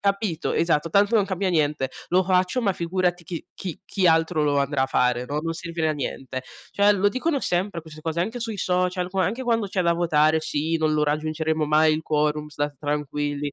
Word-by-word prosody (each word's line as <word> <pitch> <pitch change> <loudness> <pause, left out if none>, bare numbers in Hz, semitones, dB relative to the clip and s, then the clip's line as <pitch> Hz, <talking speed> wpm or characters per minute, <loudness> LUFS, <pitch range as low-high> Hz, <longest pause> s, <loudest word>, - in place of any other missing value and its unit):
capito? 200 -4 -1
Esatto, 165 -1 +1
tanto 200 +6 +3
non 200 -2 +2
cambia 190 0 -1
niente. 150 -5 0 0.2
Lo 180 - +4
faccio, 185 +5 +1
ma 200 -3 +2
figurati 175 0 -1
chi 170 -1 -6
chi 180 -4 -6
chi 190 -3 0
altro 160 -1 +3
lo 145 -1 +2
andrà 140 -1 +1
a - - -3
fare, 125 -2 +1
no? 145 +3 -2
Non 165 0 -2
servire 165 -1 -2
a - - +1
niente. 130 -2 -5 0.3
Cioè, 205 +1 +4
lo 200 +1 +3
dicono 280 +4 -1
sempre, 175 -1 -1
queste 155 -1 -12
cose, 160 +1 -2
anche 225 +7 -2
sui 225 -2 -3
social, 180 -1 0
qua 190 0 +1
anche 235 +7 -3
quando 230 -4 +1
c'è 190 -1 -1
da 170 - +3
votare: 160 -2 +3
"Sì, 160 +2 -1
non 155 -1 +1
lo 150 - +2
raggiungeremo 155 +1 -1
mai 155 +1 +4
il 155 - -1
quorum, 150 0 0
stat 145 -1 -3
tranquilli", 145 0 -2
165 Hz, 210 wpm, -24 LUFS, 150-185 Hz, 0.3 s, Lo